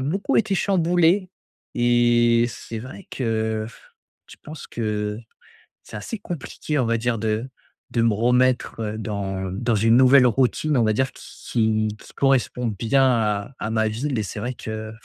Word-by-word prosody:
beaucoup 175 +9 -1
été 205 -3 +2
chamboulé 180 0 +2 0.4
et 120 -1 +3
c'est 115 -1 -7
vrai 130 - -10
que, 110 -3 -1
pff, 115 - -16 0.4
je - - -13
pense 155 -1 -9
que 105 -2 -3 0.7
c'est - - -12
assez 205 - -6
compliqué, 155 -4 -5
on 125 - +2
va 115 0 +1
dire, 115 0 -1
de 110 +3 -1 0.4
de 115 - +1
me 115 -2 +3
remettre, 125 +3 +1
heu, 110 0 -3
dans 95 -3 -4
dans 115 +4 0
une 115 +2 +4
nouvelle 130 0 +6
routine, 135 +5 +1
on 120 - +3
va 110 - +2
dire, 130 +4 0
qui - - -14 0.3
qui 110 -2 +2
qui - - -15
correspond 135 -2 +1
bien 115 +6 +1
à 110 -2 +1
à 105 - -3
ma 110 -1 +1
ville. 125 +4 -2
Et 105 - -1
c'est 105 - -6
vrai 120 +4 -3
qu'il 110 -1 -6
115 Hz, 170 wpm, -23 LUFS, 110-130 Hz, 0.7 s, nouvelle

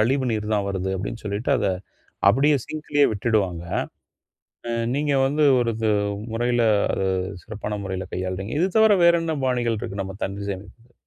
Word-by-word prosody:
கழிவு 130 +4 +2
நீர் 110 0 -2
தான் 100 -1 0
வருது 95 -1 -2
அப்டின்னு 105 +4 -5
சொல்லிட்டு 100 +3 -2
அத - - 0 0.6
அப்டியே 145 +3 +4
சிங்க்லயே 150 -2 +1
விட்டுடுவாங்க. 100 -6 0 1.3
நீங்க 145 0 0
வந்து 150 +3 +1 0.2
ஒரு 115 -1 +1
இது 110 -1 0 0.4
முறையில, 120 +1 +1 0.3
அது 95 - 0 0.4
சிறப்பான 105 -1 -5
முறையில 95 -1 -4
கையாளுறீங்க. 95 +3 -3
இது 185 - +3
தவிர 220 -2 +6
வேறென்ன 165 -2 +3
பாணிகள் 120 -3 0
இருக்கு 100 -1 -4
நம்ம 95 0 -7
தண்ணீர் 100 +1 -4
சேமிப்ப? 105 +5 -11
110 Hz, 145 wpm, -23 LUFS, 100-135 Hz, 1.3 s, தவிர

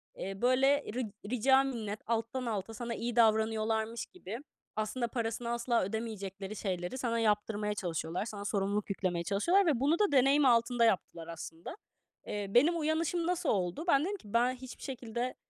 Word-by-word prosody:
Eee, 195 +1 -6
böyle, 270 +3 +4
ri 250 +1 -1 0.3
rica 265 +3 +4
minnet 220 -6 -3
alttan 230 +3 -1
alta 220 -1 -3
sana 235 +1 -4
iyi 235 +1 -3
davranıyorlarmış 220 0 +2
gibi 230 - -8 0.4
aslında 225 +3 -1
parasını 230 0 -3
asla 235 0 +1
ödemeyecekleri 200 -1 -4
şeyleri 185 +1 -3
sana 235 -3 0
yaptırmaya 210 -1 +1
çalışıyorlar, 175 -1 -3
sana 205 -3 -6
sorumluluk 205 0 -1
yüklemeye 185 -3 -1
çalışıyorlar 340 - +3
ve 295 -8 +2
bunu 295 +6 +2
da 415 -2 +3
deneyim 275 +2 +5
altında 235 -1 +4
yaptılar 175 -5 0
aslında. 165 - -8 0.5
Eee, 205 -1 -3
benim 295 - +4
uyanışım 330 +2 0
nasıl 360 -1 0
oldu? 185 - 0
Ben 275 -5 +5
dedim 405 +2 -2
ki: 210 - -14
"Ben 245 +2 +3
hiçbir 255 0 -10
şekilde 245 -1 -4
230 Hz, 160 wpm, -32 LUFS, 205-255 Hz, 0.5 s, deneyim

